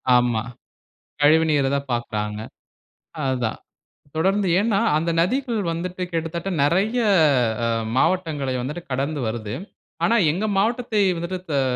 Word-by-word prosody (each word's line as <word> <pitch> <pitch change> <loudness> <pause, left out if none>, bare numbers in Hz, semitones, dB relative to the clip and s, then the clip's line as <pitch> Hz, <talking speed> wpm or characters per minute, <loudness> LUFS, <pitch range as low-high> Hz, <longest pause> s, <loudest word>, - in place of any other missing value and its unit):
ஆமா. 120 -3 +2 0.8
கழிவுநீர 150 -2 +4
தான் 140 -1 -3
பாக்குறாங்க. 105 -3 -3 0.8
அதுதான். 125 -4 -1 0.6
தொடர்ந்து 190 +4 +1
ஏன்னா, 205 -2 +2 0.2
அந்த 165 +2 -1
நதிகள் 240 +3 0
வந்துட்டு, 180 +2 -4
கிட்டத்தட்ட 165 +3 -3
நிறைய 195 +10 +2 0.7
அ - - +1 0.3
மாவட்டங்களை 155 -7 +1
வந்துட்டு 150 +7 -5
கடந்து 140 +3 -1
வருது. 110 -2 -4 0.5
ஆனா, 235 - +3 0.2
எங்க 195 +7 -2
மாவட்டத்தை 225 0 +1 0.2
வந்துட்டு, 175 +2 -4 0.2
அ - - +3
165 Hz, 110 wpm, -23 LUFS, 135-195 Hz, 0.8 s, கழிவுநீர